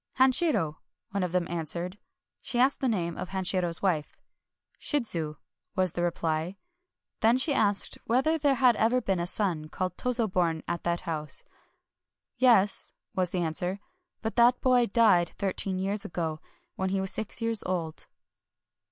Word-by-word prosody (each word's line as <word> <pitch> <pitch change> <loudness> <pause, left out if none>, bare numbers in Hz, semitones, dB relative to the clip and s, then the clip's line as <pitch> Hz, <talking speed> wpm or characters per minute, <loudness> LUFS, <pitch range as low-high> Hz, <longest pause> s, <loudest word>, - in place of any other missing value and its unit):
"Hanshiro," 255 - +3 0.3
one 200 0 -1
of 180 -2 -1
them 180 -1 0
answered. 170 +3 -2 0.4
She 245 - -5
asked 260 +3 +3
the 265 - +1
name 170 -8 -1
of 180 - -5
Hanshiro's 185 -2 -1
wife. 165 -6 -1 0.3
" - - -44
Shidzu," 170 - -1 0.4
was 185 -2 +2
the 175 - -3
reply. 170 +1 -1 0.6
Then 230 +3 +4
she 285 +3 +3
asked 205 -5 +1
whether 290 +8 +1
there 285 -2 +2
had 250 -2 +4
ever 235 +3 +3
been 195 -6 -1
a 170 - -2
son 175 -6 0
called 185 +1 -4
Tozo 240 -3 +1
born 170 -4 0
in 170 0 -2
that 170 0 -1
house. 155 -2 0 1.0
"Yes," 230 -6 +3 0.2
was 185 -2 0
the 180 0 -2
answer; 175 +4 -1 0.4
"but 220 - -3
that 240 +1 +5
boy 250 -2 +3
died 195 -6 +3
thirteen 195 -1 -1
years 195 +2 -2
ago, 160 -3 -3 0.3
when 190 0 -2
he 195 0 0
was 190 0 -2
six 220 +1 -1
years 230 -2 +1
old." 170 -4 -3
190 Hz, 160 wpm, -28 LUFS, 170-230 Hz, 1.0 s, that